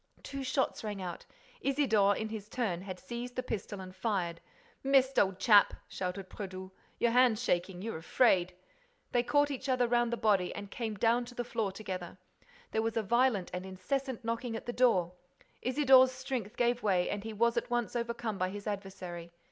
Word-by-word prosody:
Two 275 -1 -5
shots 260 -1 0
rang 210 -2 -4
out. 180 -2 -6 0.3
Isidore, 225 -8 +3
in 220 - -3
his 215 -1 -7
turn, 210 -9 -1
had 185 -1 -7
seized 245 +1 -6
his 255 - -2
pistol 205 -3 -4
and 185 0 -9
fired. 185 -4 -1 0.4
"Missed, 270 -1 +4
old 190 -2 +2
chap!" 205 -3 +6
shouted 185 +1 -4
Brédoux. 190 -2 -7 0.3
"Your 235 - +2
hand's 245 -2 +4
shaking.—You're 185 +1 -1
afraid—" 180 -1 +3 0.6
They 245 - +3
caught 290 +3 +2
each 275 0 -4
other 250 -2 +3
round 240 0 +2
the 235 - -1
body 205 -5 +2
and 200 -1 -7
came 225 -3 -3
down 235 +3 +2
to 245 0 -12
the 245 - -2
floor 225 -4 -2
together. 185 -3 -6 0.5
There 220 - +1
was 225 +1 -1
a 225 - +1
violent 235 -3 +2
and 180 0 -3
incessant 230 +7 -3
knocking 230 0 -2
at - - -6
the 240 - -3
door. 190 -9 +3 0.5
Isidore's 260 -1 +6
strength 255 -4 -4
gave 240 0 +2
way 185 -4 +2
and 205 0 -3
he 225 - -5
was 235 +2 +2
at 235 - -1
once 240 -1 -1
over 235 0 -1
come 220 -4 -4
by 185 0 +1
his 205 +1 -7
adversary. 190 -4 -5
225 Hz, 190 wpm, -32 LUFS, 190-245 Hz, 0.6 s, chap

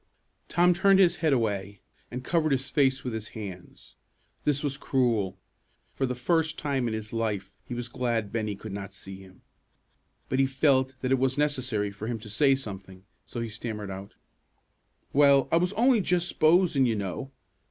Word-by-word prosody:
Tom 175 +1 +4
turned 195 +2 +4
his 175 -3 +4
head 160 -2 +1
away, 100 -5 -1 0.3
and 125 +1 -6
covered 160 +1 +1
his 135 0 -2
face 135 -2 +2
with 125 - -3
his 110 -1 -4
hands. 95 -4 -9 0.5
This 145 -1 +1
was 140 -2 -1
cruel. 115 -9 0 0.6
For 135 - -1
the 125 - -2
first 160 +5 0
time 135 -4 -1
in 110 - -2
his 110 0 -6
life, 105 -4 -2
he 120 - -5
was 120 0 -4
glad 120 -4 -2
Bennie 110 -3 -2
could 110 +1 -9
not 100 0 -6
see 95 0 -9
him. 95 -1 -16 0.8
But 130 - -1
he 135 - +4
felt 135 -1 +2
that 130 - -1
it 135 - +3
was 130 +1 +1
necessary 130 -8 0
for 100 +2 -7
him 120 -1 -2
to 110 -1 -10
say 135 +5 +4
something, 95 -7 -8 0.2
so 120 - -5
he 115 - -3
stammered 105 -2 -5
out, 95 +1 -8 1.0
"Well, 140 -2 +5
I 165 - +5
was 180 +2 +1
only 235 +1 +4
just 180 -1 +1
s'posin', 155 -5 +3
you 115 - +1
know. 100 +6 -4
125 Hz, 185 wpm, -27 LUFS, 105-145 Hz, 1.0 s, Well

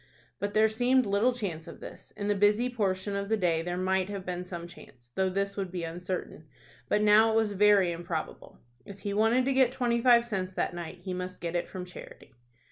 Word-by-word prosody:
But 205 0 -3
there 215 +1 +5
seemed 245 +3 +2
little 205 +5 +2
chance 190 -10 -5
of - - -10
this. - - -11
In 205 - -3
the 205 - +3
busy 210 +5 +3
portion 200 -3 -1
of 200 0 -3
the 220 - +2
day 170 -4 +1
there 175 +1 -3
might 185 +1 0
have 200 -2 -5
been 180 0 -4
some 175 -2 -6
chance, 125 -8 -15
though 190 0 +1
this 200 +1 -2
would 195 -3 -4
be 180 -2 -4
uncertain; 175 -1 -5 0.4
but 210 - +2
now 215 +2 +6
it - - 0
was 220 -2 +2
very 200 -2 +4
improbable. 170 -1 -5 0.3
If 200 -1 -12
he 200 - -3
wanted 225 +5 +3
to 275 - +1
get 260 -2 +4
twenty 240 -2 0
five 240 -1 +5
cents 190 -5 -3
that - - -1
night 175 +1 -7
he 185 - -4
must 180 0 -5
get 170 0 -4
it 175 - -1
from 185 -1 -6
charity. 180 -6 -12
195 Hz, 220 wpm, -29 LUFS, 180-220 Hz, 0.4 s, now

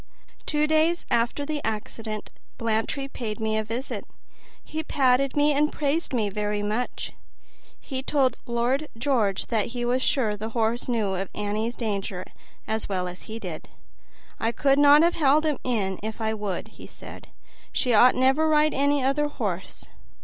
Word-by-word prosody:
Two 300 0 +2
days 315 +3 +2
after 240 +5 +1
the 300 0 -3
accident 215 0 -4 0.3
Blantyre 230 +4 -1
paid 225 -6 -5
me 220 0 0
a 220 - +1
visit; 230 +5 -4 0.6
he 315 - -4
patted 270 -2 +2
me 295 +1 +4
and 300 +2 +2
praised 300 +3 -1
me 230 -5 +1
very 210 +1 -2
much; 215 +4 -2 0.7
he 260 -1 -5
told 265 -3 +2
Lord 245 +5 0
George 225 -7 +1
that 220 -3 +1
he 240 - -1
was 250 +2 +1
sure 230 -6 +1
the 215 +2 -5
horse 230 +1 0
knew 220 -6 0
of 190 0 -3
Annie's 210 +3 -2
danger 200 -5 -3 0.4
as 220 -1 -2
well 185 -2 -1
as 180 +3 -9
he 220 - -4
did. 230 - -7 0.7
"I 225 - +1
could 275 +3 +2
not 290 +2 +8
have 340 +1 +4
held 300 0 +3
him 300 -3 0
in 200 -7 -1
if 220 +2 -5
I 220 -1 0
would," 205 -4 -4 0.2
said - - -11
he, - - -29 0.4
"she 250 -3 +1
ought 245 +4 +7
never 265 +4 +3
to - - +3
ride 305 0 +4
any 285 0 +2
other 285 +3 +2
horse." 200 -10 -4
240 Hz, 170 wpm, -26 LUFS, 215-285 Hz, 0.7 s, not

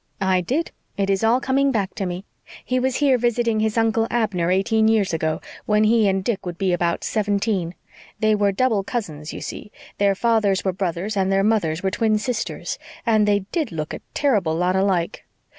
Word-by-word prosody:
"I 190 -1 +2
did. 275 - -1 0.3
It 200 0 +1
is 195 +2 0
all 230 +3 +4
coming 275 +1 +1
back 200 -6 -1
to 195 - -3
me. 180 +2 -5 0.4
He 255 0 0
was 260 0 0
here 275 -4 +3
visiting 235 -1 +1
his 220 +1 0
Uncle 225 0 +2
Abner 200 -7 0
eighteen 220 +4 +2
years 215 -5 +2
ago, 160 -1 -1 0.3
when 210 0 +3
he 220 -1 +4
and 190 -1 +1
Dick 220 -1 -2
would 175 -2 -6
be 190 -1 +1
about 170 -1 0
seventeen. 200 -4 -1 0.4
They 215 0 +3
were 205 -1 +2
double 215 -1 +1
cousins, 160 -10 -4
you - - -7
see. 210 - -7 0.3
Their 200 -1 +3
fathers 215 -3 +1
were 190 - +1
brothers 185 +3 -2
and 190 -1 +1
their 195 0 +3
mothers 195 -7 +1
were 190 - +1
twin 215 +1 +1
sisters, 220 +1 -3 0.3
and 215 -3 +3
they 205 -1 +3
did 315 - -1
look 155 -2 -4
a - - -6
terrible 205 - +1
lot 180 +2 +1
alike. 190 -2 0
205 Hz, 195 wpm, -22 LUFS, 185-225 Hz, 0.4 s, all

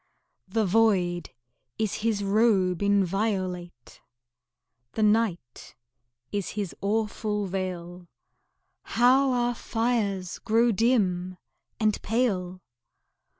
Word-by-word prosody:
The 215 +3 0
void 185 -4 +2 0.5
is 215 -3 -1
his 215 -2 0
robe 195 -3 +2
inviolate, 190 - -1 0.9
The 220 - 0
night 210 - 0 0.6
is 200 -2 -2
his 200 -4 -3
awful 210 0 -1
veil 180 -2 -5 0.9
How 260 +3 +5
our 245 -1 +1
fires 225 -6 -2
grow 230 +2 +2
dim 185 -5 +1 0.4
and 215 -2 +1
pale! 185 -6 -1
205 Hz, 85 wpm, -26 LUFS, 185-225 Hz, 0.9 s, How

